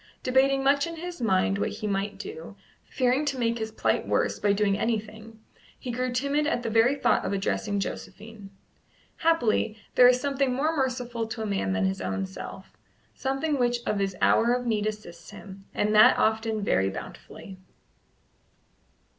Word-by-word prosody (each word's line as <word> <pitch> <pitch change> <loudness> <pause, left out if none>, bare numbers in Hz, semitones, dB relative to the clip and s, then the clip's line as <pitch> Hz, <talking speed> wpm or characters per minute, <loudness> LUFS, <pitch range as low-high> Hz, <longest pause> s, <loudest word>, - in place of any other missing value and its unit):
Debating 270 +1 +2
much 280 +2 +3
in 335 - -6
his 345 -2 -7
mind 195 -2 +1
what - - 0
he - - -7
might 200 0 -2
do, 450 +4 -8 0.3
fearing 255 +2 +1
to 280 -3 -2
make 235 -1 0
his 220 0 -4
plight - - 0
worse - - 0
by 205 - +2
doing 200 -1 +2
anything, 220 +1 -4 0.4
he 250 - -6
grew 250 +1 -2
timid 280 +4 0
at 245 -6 -1
the 230 - -2
very 230 +5 +4
thought 285 - +1
of - - -2
addressing 200 +1 -1
Josephine. 205 +1 -7 0.7
Happily, 240 -9 +1 0.2
there 250 - +7
is 250 0 +4
something 275 -1 0
more 310 +5 0
merciful 245 -4 -2
to 225 0 -5
a - - -3
man 195 - -1
than 95 0 0
his 95 0 -2
own 95 +1 -2
self 95 - -10 0.4
something 275 +2 -2
which 240 -1 0
in 210 - -1
his 195 -1 -1
hour 235 +2 +4
of 250 0 -4
need 215 -3 0
assists 210 -5 -7
him, 195 -1 -12
and 210 +1 0
that 215 0 +7
often 220 -1 0
very 95 - +1
bountifully. 185 - -10
225 Hz, 170 wpm, -26 LUFS, 205-260 Hz, 0.7 s, there